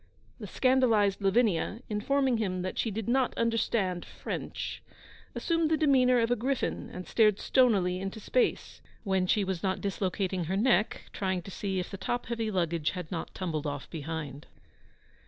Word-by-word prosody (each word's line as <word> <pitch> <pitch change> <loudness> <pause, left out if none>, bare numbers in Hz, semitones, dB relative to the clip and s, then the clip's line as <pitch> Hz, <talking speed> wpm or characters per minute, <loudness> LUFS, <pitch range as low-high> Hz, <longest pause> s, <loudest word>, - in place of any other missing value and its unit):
The - - -6
scandalised 230 -7 +3
Lavinia, 200 0 +2
informing 255 +4 +1
him 185 -4 -1
that 185 - -4
she 230 - +1
did 215 0 -4
not 255 +1 +1
understand 220 -6 0
French, - - -5 0.5
assumed 330 -2 +1
the 315 - +3
demeanour 255 -5 +4
of 230 0 +1
a - - +4
griffin, 255 +3 -2
and 180 0 -7
glared 215 -3 +5
stonily 200 -10 +3
into 195 +3 -5
space, 480 - 0 0.2
when 190 -3 +1
she 210 +2 +3
was 190 -3 -2
not 190 -1 0
dislocating 190 -2 -1
her 190 +4 -1
neck 225 -1 +2
trying 185 -3 -1
to 195 - -9
see 195 0 -2
if 180 - -5
the 195 - -5
top 240 +6 -2
heavy 230 -2 -2
luggage 170 -5 0
had 180 -4 -6
not 170 -3 -5
tumbled 155 -5 -2
off 145 -1 -4
behind. 150 -2 -5
200 Hz, 165 wpm, -29 LUFS, 180-235 Hz, 0.5 s, glared